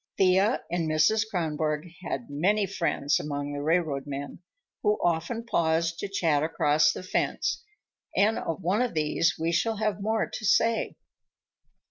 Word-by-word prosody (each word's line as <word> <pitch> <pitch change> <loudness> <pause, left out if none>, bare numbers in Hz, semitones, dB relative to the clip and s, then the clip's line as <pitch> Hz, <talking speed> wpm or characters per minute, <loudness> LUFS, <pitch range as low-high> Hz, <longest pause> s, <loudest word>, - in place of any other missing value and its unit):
Thea 190 +5 +3
and 170 -2 -1
Mrs. 215 +9 +3
Kronborg 155 -3 -1
had 135 -8 -4
many 200 +8 +2
friends 170 -6 0
among 145 -1 -4
the 145 - -4
railroad 155 -3 0
men, 140 0 -6 0.4
who 210 -1 +2
often 175 +8 -1
paused 165 -3 +1
to - - -3
chat 165 -7 +1
across 150 -1 +3
the - - -7
fence, 185 - -1 0.5
and 215 +3 +3
of 165 +2 -4
one 190 +7 +1
of 245 -7 -1
these 155 0 +1
we 165 +1 -1
shall 220 +6 0
have 215 -1 -1
more 220 +2 0
to - - -7
say. 225 +2 +2
170 Hz, 150 wpm, -27 LUFS, 150-205 Hz, 0.5 s, Thea